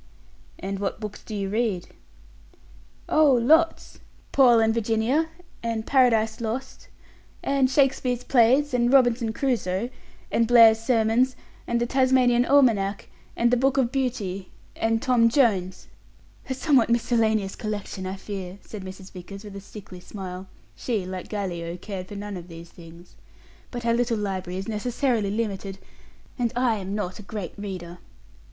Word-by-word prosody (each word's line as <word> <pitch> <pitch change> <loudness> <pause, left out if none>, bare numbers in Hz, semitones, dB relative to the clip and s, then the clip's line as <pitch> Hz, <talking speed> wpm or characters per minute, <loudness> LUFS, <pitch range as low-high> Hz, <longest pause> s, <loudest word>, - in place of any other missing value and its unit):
"And 195 +1 -5
what 200 +1 -3
books 210 -2 -7
do 215 - -7
you 195 -1 -2
read?" 210 -4 -1 1.2
"Oh, 305 -3 +4
lots! 310 +8 +2 0.3
'Paul 245 -4 +6
and 225 0 +3
Virginia', 230 +8 +1 0.3
and 230 -1 -3
'Paradise 230 -4 +3
Lost', 240 +4 -5 0.6
and 275 -2 +2
'Shakespeare's 260 -2 +1
Plays', 260 +3 +3
and 240 0 +2
'Robinson 245 -4 +3
Crusoe', 235 -4 -1 0.4
and 230 - +2
'Blair's 225 -2 +7
Sermons', 230 +2 +2 0.3
and 235 0 0
'The 240 - +1
Tasmanian 255 -1 +3
Almanack', 225 -9 +2 0.3
and 235 0 +3
'The 250 - +4
Book 270 +2 +1
of 250 -3 +2
Beauty', 220 -9 -2 0.3
and 225 0 0
'Tom 245 -4 +4
Jones'." 210 -8 +1 0.6
"A 260 - -1
somewhat 265 -4 +3
miscellaneous 220 -4 +1
collection, 205 -3 -5
I 190 - -4
fear," 195 -2 -7
said 210 -3 -9
Mrs. 190 0 -10
Vickers, 195 +2 -10
with 205 -2 -10
a 195 - -7
sickly 195 -2 -11
smile 185 0 -8 0.3
she, 220 -7 -2
like 185 0 -6
Gallio, 175 -4 -4
cared 185 0 -7
for 205 - -9
none 205 -1 -5
of 175 -1 -10
these 170 0 -11
things 170 +1 -15 0.5
"but 240 -1 -6
our 230 - +3
little 235 -1 +1
library 185 -3 -3
is 190 - -5
necessarily 230 0 -1
limited, 200 -2 -3 0.6
and 235 -2 +1
I 245 -3 +2
am 195 0 -5
not 195 -1 -4
a - - -7
great 200 -3 -6
reader. 180 -4 -7
220 Hz, 150 wpm, -25 LUFS, 195-245 Hz, 1.2 s, Blair's